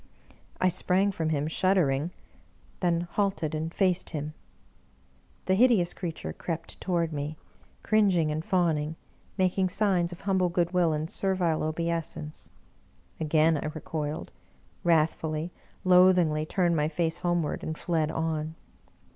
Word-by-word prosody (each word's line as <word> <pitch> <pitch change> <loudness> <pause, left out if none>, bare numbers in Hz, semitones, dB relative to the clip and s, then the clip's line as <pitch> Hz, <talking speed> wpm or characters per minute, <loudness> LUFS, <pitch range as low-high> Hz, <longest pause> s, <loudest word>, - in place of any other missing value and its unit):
I 185 - +3
sprang 185 +2 +2
from 160 -4 -2
him 150 -1 0
shuddering, 160 -4 +2 0.7
then 170 -2 +1
halted 175 -3 -1
and 160 +1 -2
faced 185 -1 +1
him. 150 -1 -4 1.1
The 190 - +2
hideous 210 -5 +4
jcreature 170 -3 -5
crept 165 -1 -5
toward 170 -3 0
me, 150 +1 -4 0.5
cringing 195 -7 +3
and 155 +1 -2
fawning, 165 -5 +1 0.4
making 185 0 +2
signs 185 -3 +1
of 175 - -9
humble 190 -2 +1
goodwill 175 -1 +2
and 155 +1 -1
ser 190 +2 -1
vile 170 -4 +1
obeisance. 160 -1 -3 0.7
Again 155 0 +3
I 150 - -3
recoiled 155 -1 -4 0.3
— 65 0 -33
^wrathfully, 160 0 +1 0.3
loathingly, 180 -4 +5
turned 175 -2 +1
my 150 -1 +2
face 165 +1 -1
homeward, 175 -3 0
and 160 0 -4
fled 160 -3 0
on. 160 -1 -2
165 Hz, 130 wpm, -28 LUFS, 155-180 Hz, 1.1 s, loathingly